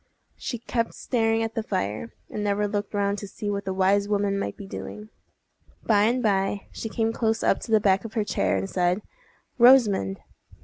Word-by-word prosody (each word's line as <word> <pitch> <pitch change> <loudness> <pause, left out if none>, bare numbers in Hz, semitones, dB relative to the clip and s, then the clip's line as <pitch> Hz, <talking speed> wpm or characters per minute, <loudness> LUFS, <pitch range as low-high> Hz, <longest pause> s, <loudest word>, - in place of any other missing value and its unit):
She 240 - -4
kept 230 0 -2
staring 225 -2 +1
at 225 0 -3
the 225 - -1
fire, 110 - -3 0.2
and 210 - -4
never 205 0 +1
looked 205 0 -3
round 200 0 0
to 200 - -7
see 205 +1 -4
what 200 0 -3
the 190 - -2
wise 195 +2 +2
woman 200 -1 +1
might - - -4
be 200 - -8
doing. 210 +2 -8 0.7
By 210 -2 +4
and 245 +3 +1
by 200 -1 +1
she 225 - -5
came 225 0 0
close 225 -1 0
up - - +3
to 225 - -8
the 220 - +6
back 195 -2 +2
of 225 -1 -8
her 215 -2 +1
chair, 95 - 0
and 95 0 -2
said, 180 - 0 0.6
"Rosamond!" 220 - +5
205 Hz, 195 wpm, -25 LUFS, 195-225 Hz, 0.7 s, the